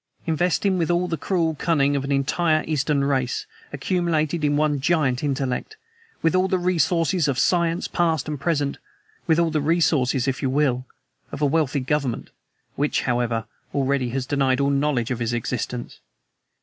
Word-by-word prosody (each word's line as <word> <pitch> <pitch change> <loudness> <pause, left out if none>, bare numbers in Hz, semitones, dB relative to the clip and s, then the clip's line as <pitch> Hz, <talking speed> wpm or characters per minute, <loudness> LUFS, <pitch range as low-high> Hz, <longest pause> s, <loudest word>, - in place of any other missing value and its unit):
Invest 175 +4 0
him 190 -2 +2
with 165 - 0
all 175 +1 +1
the 170 - -1
cruel 165 0 0
cunning 145 -2 +1
of 140 - -1
an 140 - -3
entire 155 +3 +1
Eastern 150 -2 0
race, 130 -3 0 0.3
accumulated 160 0 0
in 145 0 +2
one 150 -1 +1
giant 135 -4 +1
intellect, 140 - -2 0.5
with 165 - +3
all 185 +1 +3
the 185 - +1
resources 175 -1 +1
of 135 -3 0
science 170 +4 +1
past 160 -5 0
and 150 -2 -4
present, 145 -3 0 0.5
with 160 -1 +4
all 170 -1 +2
the 155 -1 0
resources, 145 -5 +2
if 135 -1 -1
you 135 - 0
will, 130 -2 +1 0.5
of - - -6
a 150 - +2
wealthy 145 -2 +1
government 130 -2 -2 0.4
which, 145 +1 0
however, 120 -2 -1 0.3
already 135 -2 +1
has 130 +1 -2
denied 135 -2 +1
all 140 0 +2
knowledge 140 -4 0
of 125 - -2
his 120 0 -1
existence. 120 +1 -4
145 Hz, 170 wpm, -23 LUFS, 135-165 Hz, 0.5 s, with